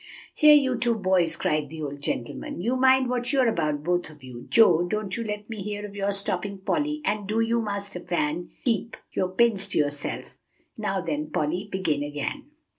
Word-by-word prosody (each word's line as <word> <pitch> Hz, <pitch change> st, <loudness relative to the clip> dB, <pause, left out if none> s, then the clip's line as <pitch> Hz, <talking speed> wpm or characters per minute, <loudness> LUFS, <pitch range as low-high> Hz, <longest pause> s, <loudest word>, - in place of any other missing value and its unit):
"Here, 300 Hz, 0 st, +7 dB
you 260 Hz, -4 st, +3 dB
two 240 Hz, -1 st, +2 dB
boys," 185 Hz, -5 st, +2 dB
cried 150 Hz, -2 st, 0 dB
the 160 Hz, 0 st, -6 dB
old 145 Hz, -1 st, -5 dB
gentleman, 120 Hz, +3 st, -4 dB
"you 235 Hz, +8 st, 0 dB
mind 260 Hz, 0 st, +5 dB
what 245 Hz, 0 st, -1 dB
you're 265 Hz, -3 st, +3 dB
about, 150 Hz, -8 st, 0 dB
both 175 Hz, +1 st, 0 dB
of 150 Hz, -3 st, -16 dB
you. 125 Hz, -2 st, -10 dB
Joe, 175 Hz, -6 st, +5 dB
don't 210 Hz, -1 st, -2 dB
you 230 Hz, -, -2 dB
let 210 Hz, -1 st, -5 dB
me 220 Hz, -3 st, -6 dB
hear 205 Hz, +1 st, -4 dB
of 205 Hz, -1 st, -9 dB
your 200 Hz, 0 st, 0 dB
stopping 200 Hz, 0 st, -2 dB
Polly; 300 Hz, +9 st, -1 dB
and 205 Hz, -1 st, -1 dB
do 215 Hz, +2 st, 0 dB
you, 230 Hz, +1 st, +2 dB
master 200 Hz, -3 st, -4 dB
Van, 170 Hz, -1 st, -2 dB, 0.2 s
keep 230 Hz, -1 st, 0 dB, 0.2 s
your 185 Hz, -, 0 dB
pins 200 Hz, 0 st, +2 dB
to 195 Hz, -, -3 dB
yourself. 145 Hz, -1 st, -2 dB, 0.4 s
Now, 195 Hz, -3 st, -1 dB
then, 155 Hz, -3 st, -3 dB
Polly, 175 Hz, +7 st, -1 dB
begin 160 Hz, -6 st, 0 dB
again." 145 Hz, -, -4 dB
200 Hz, 190 wpm, -26 LUFS, 160-230 Hz, 0.4 s, Here